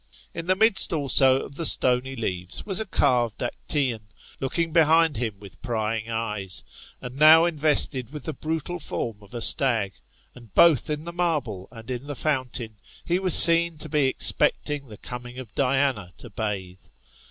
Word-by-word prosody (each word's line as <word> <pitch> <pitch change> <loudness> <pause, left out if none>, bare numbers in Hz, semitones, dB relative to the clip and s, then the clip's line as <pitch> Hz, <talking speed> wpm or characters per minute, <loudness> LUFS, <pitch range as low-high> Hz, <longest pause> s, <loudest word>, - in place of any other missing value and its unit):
In 165 +1 -7
the 185 - +2
midst 220 -2 +3
also 135 -3 +2
of - - -10
the 165 - -5
stony 130 +1 +2
leaves 90 -6 -4
was 195 -1 -2
a 220 - -4
carved 125 - 0
ActscOQ, 130 -1 -3 0.4
looking 160 +5 -3
behind 160 -2 +3
him 110 -4 -4
with 95 -4 -15
prying 115 -2 -3
eyes, 105 -4 -4 0.4
and 125 +1 -8
now 160 +2 +7
invested 145 -6 +1
with 150 -3 -9
the 155 - -5
brutal 160 +4 -5
form 115 -7 -5
of 105 +4 -15
a 120 - -5
stag; 115 -9 +2 0.4
and 120 -4 -16
both 165 -3 +4
in 150 0 -4
the 170 +1 -8
marble 145 - -3
and 115 +1 -11
in 125 +3 -6
the 145 - -6
fountain' 125 -6 -4 0.3
he 175 +1 0
was 185 -3 +6
seen 170 -1 +7
to 155 - -7
be 145 -2 +1
expecting 140 +1 +1
the 105 -3 -12
coming 125 +2 -9
of 120 -4 -10
Diana 130 -8 -1
to 120 - -12
bathe. 95 -4 -5
130 Hz, 170 wpm, -24 LUFS, 115-155 Hz, 0.4 s, now